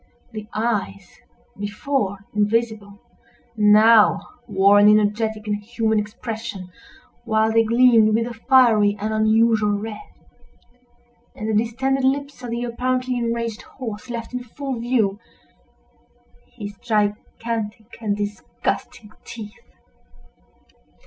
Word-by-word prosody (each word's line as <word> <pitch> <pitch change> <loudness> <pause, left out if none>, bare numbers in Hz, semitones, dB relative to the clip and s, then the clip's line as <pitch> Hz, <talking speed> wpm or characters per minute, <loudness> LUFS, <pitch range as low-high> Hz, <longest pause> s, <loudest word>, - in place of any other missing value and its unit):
The 215 -2 -8
eyes, 205 -4 -3 0.4
before 205 -1 -2
invisible, 210 -1 -1 0.6
now 215 +1 +5 0.2
wore 200 -1 +4
an 205 +1 +7
energetic 215 +1 +1
and 210 -1 -1
human 220 +1 -1
expression, 210 -3 -6 0.5
while 220 -1 +1
they 225 0 +4
gleamed 230 -2 +4
with 230 0 +1
a 240 - -6
fiery 225 -4 +4
and 215 +2 -2
unusual 220 -1 +3
red; 210 0 -6 1.3
and 215 - -5
the 220 - -1
distended 265 +4 -1
lips 275 0 -1
of 245 - -6
the 235 +1 -3
apparently 255 +1 -1
enraged 230 -2 -2
horse 240 -1 -8
left 235 0 -6
in 250 0 -4
full 265 +1 -6
view 230 -4 0 1.3
his 205 0 -8
gigantic 215 0 -2 0.2
and 205 -2 -1
disgusting 210 +1 -4
teeth. 215 -3 -9
220 Hz, 110 wpm, -22 LUFS, 210-235 Hz, 1.3 s, an